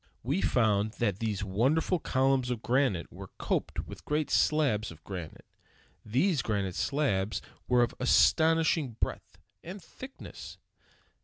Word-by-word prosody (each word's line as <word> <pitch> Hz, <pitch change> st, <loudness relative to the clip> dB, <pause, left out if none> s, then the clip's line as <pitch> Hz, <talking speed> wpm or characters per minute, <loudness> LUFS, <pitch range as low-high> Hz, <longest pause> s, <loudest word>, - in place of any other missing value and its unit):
We -, -, 0 dB
found 105 Hz, 0 st, +2 dB
that 105 Hz, -6 st, -1 dB
these 105 Hz, -3 st, -2 dB
wonderful 135 Hz, -, +1 dB
columns 130 Hz, -2 st, +1 dB
of 120 Hz, -3 st, -3 dB
granite 125 Hz, -9 st, +1 dB
were 95 Hz, +1 st, -9 dB
coped -, -, -2 dB
with -, -, -11 dB
great 150 Hz, 0 st, -1 dB
slabs 135 Hz, -9 st, +2 dB
of 80 Hz, -1 st, -13 dB
granite. 90 Hz, -5 st, -8 dB, 0.6 s
These 135 Hz, -, +1 dB
granite 100 Hz, -5 st, -1 dB
slabs 110 Hz, -, 0 dB, 0.3 s
were 125 Hz, -1 st, +4 dB
of 120 Hz, -, -1 dB
astonishing 160 Hz, -6 st, +3 dB
breadth -, -, -4 dB, 0.3 s
and 185 Hz, +4 st, -7 dB
thickness. 260 Hz, +9 st, -11 dB
120 Hz, 130 wpm, -29 LUFS, 100-150 Hz, 0.6 s, were